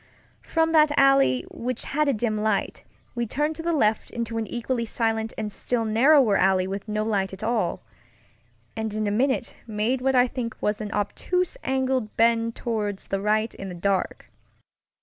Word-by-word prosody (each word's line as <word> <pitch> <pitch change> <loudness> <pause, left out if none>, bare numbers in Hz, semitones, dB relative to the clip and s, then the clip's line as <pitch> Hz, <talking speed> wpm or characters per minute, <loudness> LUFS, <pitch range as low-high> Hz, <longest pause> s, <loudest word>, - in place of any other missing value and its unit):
From 325 0 0
that 305 -2 +5
alley, 275 - +4
which 245 0 -3
had 300 +1 0
a 280 - +3
dim 220 0 -1
light, 215 -1 -1 0.3
we 240 -1 -2
turned 295 +7 -1
to - - -5
the 340 +1 -1
left 220 -9 +1
into 230 -1 -3
an 220 - -3
equally 240 0 -2
silent 225 -1 -1
and 215 -2 -4
still 235 -2 -1
narrower 235 0 +5
alley 190 -1 +3
with 195 +2 -5
no 215 0 -1
light 200 -3 -1
at 190 +3 -8
all; 220 - -1 0.9
and 220 -1 -3
in 215 0 -1
a 205 - 0
minute 255 +3 0
made 225 +4 -1
what 265 +1 +1
I 250 0 +6
think 235 -2 -5
was 210 0 -1
an 210 -1 -5
obtuse 360 - -1
angled 260 -4 -1
bend 230 0 +2
toward 210 -4 -2
the 195 0 -4
right 215 +2 +1
in 195 - -7
the 180 - -7
dark. 190 +1 -2
225 Hz, 180 wpm, -25 LUFS, 210-260 Hz, 0.9 s, I